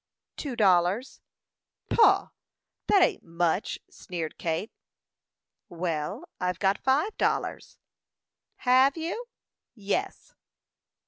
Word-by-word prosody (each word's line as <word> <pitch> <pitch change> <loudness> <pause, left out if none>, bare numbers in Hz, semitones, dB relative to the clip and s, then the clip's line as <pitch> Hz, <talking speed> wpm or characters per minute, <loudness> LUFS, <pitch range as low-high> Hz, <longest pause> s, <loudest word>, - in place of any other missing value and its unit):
"Two 275 -5 -5
dollars." 195 +4 +2 0.7
"Pooh! 460 - +4 0.6
that 395 -3 +5
ain't - - +1
much!" 170 +3 -1
sneered 165 -4 -6
Kate. 165 +6 -2 1.0
"Well, 170 - -3
I've 180 -2 -1
got 195 +1 +1
five 295 +11 +1
dollars." - - -1 0.8
"Have 260 +4 +4
you?" 345 +9 -4 0.5
"Yes." 240 - -3
205 Hz, 85 wpm, -27 LUFS, 175-280 Hz, 1.0 s, that